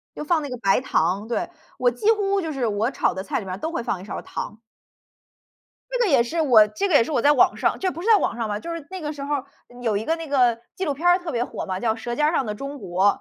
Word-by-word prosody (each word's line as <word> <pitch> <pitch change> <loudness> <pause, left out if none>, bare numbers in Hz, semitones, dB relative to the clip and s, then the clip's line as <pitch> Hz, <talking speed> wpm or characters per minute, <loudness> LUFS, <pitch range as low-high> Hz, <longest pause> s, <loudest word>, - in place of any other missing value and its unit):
就 - - -5
放 315 0 +1
那 285 - -5
个 250 - -4
白 195 -4 +3
糖， 195 -4 0
对。 235 - -2 0.3
我 250 - +4
几 245 - +2
乎 400 -2 +1
就 325 -4 -3
是 260 -4 -1
我 215 +2 0
炒 - - +1
的 190 - -4
菜 195 - -2
里 - - -8
面 185 +1 -5
都 320 - -3
会 340 - -2
放 205 -5 -2
一 185 - -10
勺 - - -5
糖。 220 - -6 1.3
这 - - -1
个 470 -6 +2
也 265 -5 +5
是 320 +8 -2
我 240 -9 +6
这 390 - -2
个 355 - +1
也 260 - +6
是 310 - -5
我 260 - +2
在 290 - +6
网 260 - +4
上 - - 0
就 375 - 0
不 340 - -7
是 425 - -2
在 445 - +8
网 395 - -1
上 230 -2 -2
吧， 205 0 -2
就 335 - -5
是 330 -3 -6
那 375 -1 -6
个 300 -2 -3
时 285 -2 -8
候， 285 -2 -2 0.2
嗯， 245 0 -13
有 225 -4 +1
一 210 - -2
个 325 - 0
那 330 -1 -7
个 245 -4 +3 0.2
纪 380 - -2
录 290 - -1
片 320 +6 -4
儿 355 +1 +6
特 350 -2 -6
别 240 -1 0
火 - - -6
嘛， 185 -1 -3
叫 225 0 +1
《舌 240 +1 -4
尖 300 +4 +2
儿 310 - +2
上 270 - 0
的 210 - -3
中 275 +5 -6
国》。 185 -3 0
270 Hz, 325 characters per minute, -23 LUFS, 225-330 Hz, 1.3 s, 在